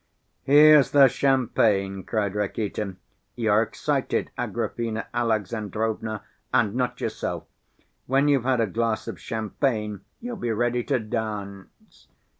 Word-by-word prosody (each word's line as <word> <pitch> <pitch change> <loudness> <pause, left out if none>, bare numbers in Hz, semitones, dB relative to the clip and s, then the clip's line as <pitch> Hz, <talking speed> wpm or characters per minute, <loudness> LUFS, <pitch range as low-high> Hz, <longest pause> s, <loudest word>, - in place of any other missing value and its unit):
"Here's 150 0 +7
the 140 -2 +7
champagne!" 110 -7 +1
cried 105 -4 -1
Rakitin. 105 -1 -3 0.4
"You're 110 -2 +3
excited, 115 - -1
Agrafena 115 -1 -3
Alexandrovna, 110 -1 -2 0.3
and 120 -5 +2
not 125 0 -1
yourself. - - -3 0.6
When 135 +3 +3
you've 140 -3 +3
had 130 -2 +2
a - - +3
glass 115 +2 -1
of - - -6
champagne, 110 -1 -2 0.2
you'll 240 0 -6
be 120 -10 -2
ready 120 +2 0
to 140 - +1
dance. 105 -4 -6
115 Hz, 115 wpm, -25 LUFS, 105-125 Hz, 0.6 s, Here's